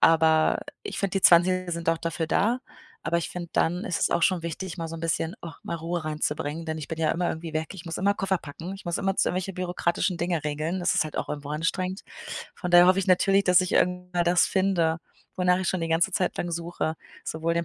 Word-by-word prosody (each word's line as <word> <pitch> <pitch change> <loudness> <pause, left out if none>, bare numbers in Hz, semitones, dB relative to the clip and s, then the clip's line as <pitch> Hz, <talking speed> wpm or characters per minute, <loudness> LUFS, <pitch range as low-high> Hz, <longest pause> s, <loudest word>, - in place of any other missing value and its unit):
aber 160 -1 +4 0.2
ich - - -5
finde, 195 -1 0
die - - -9
20er 180 +1 +5
sind 170 0 -4
auch 165 - 0
dafür 165 -1 -2
da, 230 +9 +1 0.4
aber 170 - 0
ich 170 - -2
finde, 175 -2 -6
dann 175 +4 +1
ist 170 -6 -1
es - - +1
auch 170 - +1
schon 180 -2 +3
wichtig, 170 +2 -5
mal 165 - -4
so 165 - -7
'n - - -8
bisschen, 165 +1 -1
ach, 165 -3 -9
mal 170 - -4
Ruhe 165 0 -3
reinzubringen, 155 +1 -2
denn 160 0 -2
ich 155 - -6
bin 160 - -5
ja 160 -1 +2
immer 175 +1 0
irgendwie 160 0 -6
weg, 155 0 -1
ich 180 -3 -10
muss 165 - -4
immer 200 +2 +2
Koffer 195 -1 0
packen, 165 +4 -8
ich 195 - -11
muss 175 -1 -1
immerzu 195 0 +1
irgendwelche 185 +1 -3
bürokratischen 180 0 -1
Dinge 170 -3 -1
regeln, 155 +5 -2
das 175 - +2
ist - - +3
halt 155 - -7
auch - - -3
irgendwo 145 -1 -5
anstrengend. 180 +5 -2 0.5
Von 180 - -5
daher 175 0 +8
hoffe 185 +1 +5
ich 195 - 0
natürlich, 195 +1 +4
dass 180 0 +5
ich 185 - -3
irgendwann 180 -1 +1
das 175 +1 +4
finde, 180 -4 +1 0.4
wonach 180 0 +3
ich 190 - -1
schon 185 - 0
die 165 - -2
ganze 165 +4 +2
Zeit 180 0 0
lang 175 - -2
suche, 170 -1 -2 0.3
sowohl 165 +1 -1
den 170 0 0
170 Hz, 240 wpm, -26 LUFS, 160-185 Hz, 0.5 s, daher